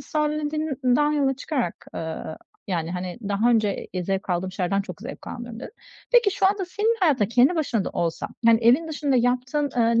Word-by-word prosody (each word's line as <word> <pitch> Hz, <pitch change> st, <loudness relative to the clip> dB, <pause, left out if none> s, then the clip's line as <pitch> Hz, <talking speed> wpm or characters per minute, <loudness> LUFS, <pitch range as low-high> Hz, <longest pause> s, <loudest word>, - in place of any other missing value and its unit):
sen 300 Hz, +2 st, -1 dB, 0.2 s
dediğinden 295 Hz, -2 st, +1 dB
yola 275 Hz, -2 st, +2 dB
çıkarak, 270 Hz, -, -3 dB
ııı, 160 Hz, -1 st, -5 dB, 0.3 s
yani, 170 Hz, -2 st, -1 dB
hani, 180 Hz, +3 st, -5 dB
daha 210 Hz, +4 st, +2 dB
önce, 215 Hz, -4 st, +1 dB
iii, 180 Hz, -2 st, -3 dB
zevk 195 Hz, 0 st, -2 dB
aldığım 180 Hz, +1 st, -1 dB
şeylerden 195 Hz, +1 st, 0 dB
çok 185 Hz, 0 st, -9 dB
zevk 250 Hz, +5 st, -9 dB
almıyorum 240 Hz, -1 st, -7 dB
dedin. -, -, -8 dB, 0.4 s
Peki 475 Hz, -4 st, +5 dB
şu 385 Hz, 0 st, +2 dB
anda 395 Hz, -1 st, +1 dB
senin 435 Hz, +5 st, 0 dB
hayatında 270 Hz, -, +3 dB
kendi 255 Hz, +8 st, +4 dB
başına 235 Hz, -10 st, 0 dB
da -, -, -3 dB
olsan, 165 Hz, -1 st, -2 dB, 0.2 s
yani 230 Hz, 0 st, +6 dB
evin 265 Hz, +8 st, +4 dB
dışında 290 Hz, -3 st, 0 dB
yaptığın, 255 Hz, +4 st, +1 dB
ııı, 230 Hz, 0 st, +3 dB
245 Hz, 185 wpm, -24 LUFS, 195-300 Hz, 0.4 s, yani